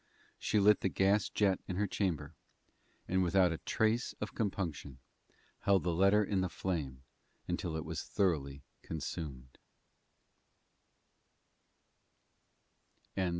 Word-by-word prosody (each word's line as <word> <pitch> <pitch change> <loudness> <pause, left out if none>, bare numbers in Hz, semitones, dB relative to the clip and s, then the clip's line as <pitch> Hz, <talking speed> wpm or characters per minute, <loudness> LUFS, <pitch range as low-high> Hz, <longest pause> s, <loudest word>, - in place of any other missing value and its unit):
She 105 - +1
lit 105 +1 +6
the 95 - 0
gas 95 +2 +2
jet 100 -3 +2
in 90 - -3
her 105 +3 +1
chamber, 85 -7 -2 0.7
and, 95 +1 +2
without 90 0 +4
a 80 - -3
trace 110 +3 0
of - - -4
compunction, 85 - -3 0.6
held 100 -2 +3
the 90 - 0
letter 100 +4 +4
in 95 -1 0
the 95 - 0
flame 75 -8 -3 0.4
until 80 -2 -2
it 80 - -5
was 80 0 -3
thoroughly 70 -9 -1 0.2
consumed. 75 -5 -6
90 Hz, 110 wpm, -33 LUFS, 80-100 Hz, 0.7 s, lit